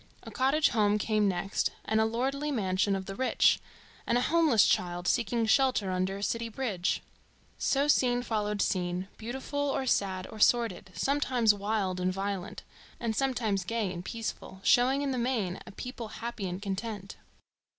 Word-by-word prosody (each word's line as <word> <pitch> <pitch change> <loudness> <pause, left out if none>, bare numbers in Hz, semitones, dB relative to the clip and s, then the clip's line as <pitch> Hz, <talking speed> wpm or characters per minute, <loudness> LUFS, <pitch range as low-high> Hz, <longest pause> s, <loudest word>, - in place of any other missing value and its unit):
A - - -9
cottage 275 +4 +3
home 210 -2 +2
came 210 -1 +1
next, 190 +1 0 0.2
and 220 0 +2
a - - +3
lordly 270 +6 -1
mansion 195 -5 +1
of 190 -1 -4
the 195 - -6
rich, 260 +5 +3 0.5
and 235 - +3
a - - +2
homeless 315 - +5
child 175 0 0
seeking 235 0 +1
shelter 230 -4 +3
under 185 +1 -1
a 200 - -6
city 230 +2 -1
bridge. 210 -7 -1 0.6
So 280 +1 +2
scene 245 -4 +3
followed 210 -3 -1
scene, 180 0 -1
beautiful, 265 +5 -5
or 280 -2 0
sad, 190 -6 0
or 215 - -9
sordid, 230 -5 +2
sometimes 260 -6 +2
wild 200 -2 -1
and 180 0 +1
violent, 195 0 -4 0.4
and 225 -2 -2
sometimes 230 -8 0
gay 215 -1 -2
and 175 0 -6
peaceful, 220 -3 -6
showing 265 +3 +4
in 280 - -1
the 255 - -1
main 230 -7 -1
a - - -8
people 245 +2 -6
happy 225 -2 -5
and 180 +1 -4
content. 200 0 -5
220 Hz, 165 wpm, -29 LUFS, 195-250 Hz, 0.6 s, homeless